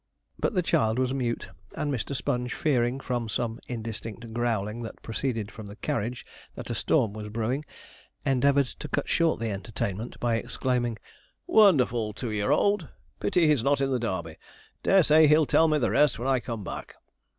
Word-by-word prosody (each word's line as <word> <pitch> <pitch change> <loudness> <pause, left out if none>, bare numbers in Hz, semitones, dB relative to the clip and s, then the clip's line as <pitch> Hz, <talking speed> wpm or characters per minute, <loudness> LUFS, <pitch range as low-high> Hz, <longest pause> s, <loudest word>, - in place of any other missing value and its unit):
But - - 0
the 180 - +2
child 110 -7 +2
was 130 0 +1
mute, 120 -3 -2 0.3
and 145 -1 -1
Mr. 125 +3 -3
Sponge 125 -1 -2
fearing, 130 -4 +1
from 120 -4 -3
some 115 0 -2
indistinct 115 -1 -6
growling 115 -2 -1
that 115 -2 -7
proceeded 115 -2 -2
from 110 -2 -9
the 100 - -9
carriage, 115 +3 -3 0.3
that - - -6
a - - 0
storm 105 - +1
was 105 -1 -6
brewing, 115 +7 -2 0.6
endeavoured 140 +1 +3
to 140 - -8
cut 145 0 -2
short 165 -5 +2
the 115 -1 -2
entertainment 100 +2 -4
by 120 -2 +1
exclaiming: 120 -1 -1 0.5
'Wonderful 125 - +4
two 120 0 -4
year 105 +2 -1
old! 185 +3 +2 0.3
Pity 175 -2 +2
he's 150 -5 +4
not 140 +3 +2
in 135 -1 +1
the 130 - +1
Darby. 90 -8 -3 0.4
Dare 195 -2 +5
say 155 +1 +6
he'll 155 +1 +5
tell 160 +3 +4
me 155 -1 +2
the 135 - +1
rest 150 -3 +3
when 120 +4 -3
I 135 -1 +3
come 115 -3 -5
back.' - - -7
120 Hz, 180 wpm, -27 LUFS, 110-140 Hz, 0.6 s, say